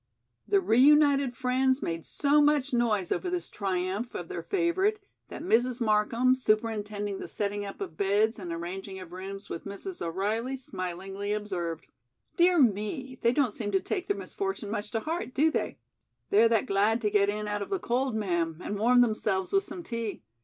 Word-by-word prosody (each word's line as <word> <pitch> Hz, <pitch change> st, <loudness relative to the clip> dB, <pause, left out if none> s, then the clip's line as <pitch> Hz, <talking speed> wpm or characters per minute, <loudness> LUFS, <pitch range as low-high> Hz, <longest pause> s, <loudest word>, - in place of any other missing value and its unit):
The 200 Hz, -, +4 dB
reunited 275 Hz, +4 st, +4 dB
friends 260 Hz, +1 st, +1 dB
made 165 Hz, -1 st, -3 dB
so 290 Hz, +1 st, +3 dB
much 290 Hz, -2 st, +2 dB
noise 220 Hz, -6 st, +1 dB
over 370 Hz, -, -1 dB
this 355 Hz, -1 st, -3 dB
triumph 195 Hz, +3 st, -2 dB
of -, -, -5 dB
their -, -, -4 dB
favorite 390 Hz, +3 st, +1 dB, 0.3 s
that -, -, -8 dB
Mrs. 250 Hz, -5 st, +2 dB
Markham, 230 Hz, +3 st, +3 dB
superintending 215 Hz, -4 st, -1 dB
the -, -, -6 dB
setting 205 Hz, 0 st, -2 dB
up 200 Hz, -, -8 dB
of 175 Hz, -5 st, -6 dB
beds 210 Hz, +3 st, +2 dB
and 180 Hz, -3 st, -6 dB
arranging 185 Hz, +3 st, -5 dB
of 185 Hz, -3 st, -10 dB
rooms 195 Hz, +2 st, -7 dB
with 165 Hz, -, -6 dB
Mrs. 205 Hz, -, -7 dB
O'Reilly, 215 Hz, +9 st, -1 dB
smilingly 195 Hz, -2 st, -4 dB
observed: 175 Hz, -6 st, -3 dB, 0.5 s
"Dear 355 Hz, +1 st, +4 dB
me, 255 Hz, +3 st, 0 dB
they 235 Hz, -, +4 dB
don't 255 Hz, -4 st, +1 dB
seem 210 Hz, -2 st, -3 dB
to 195 Hz, -, +4 dB
take 370 Hz, -, -3 dB
their 405 Hz, -, 0 dB
misfortune 390 Hz, -, -4 dB
much 210 Hz, -1 st, -3 dB
to 225 Hz, -, -2 dB
heart, 320 Hz, -3 st, -4 dB
do 315 Hz, +3 st, +4 dB
they?" -, -, -2 dB, 0.5 s
"They're 230 Hz, -, +6 dB
that 225 Hz, -3 st, +2 dB
glad 205 Hz, +3 st, +2 dB
to 210 Hz, -2 st, 0 dB
get 200 Hz, -1 st, +3 dB
in 210 Hz, 0 st, -2 dB
out 205 Hz, 0 st, -2 dB
of -, -, -4 dB
the 390 Hz, -, 0 dB
cold, 255 Hz, -5 st, -1 dB
ma'am, 170 Hz, -6 st, -1 dB
and 205 Hz, -, -3 dB
warm 245 Hz, +3 st, +5 dB
themselves 215 Hz, -, 0 dB
with 390 Hz, 0 st, +3 dB
some 350 Hz, -, -7 dB
tea. 230 Hz, -, -4 dB
215 Hz, 180 wpm, -28 LUFS, 200-265 Hz, 0.5 s, They're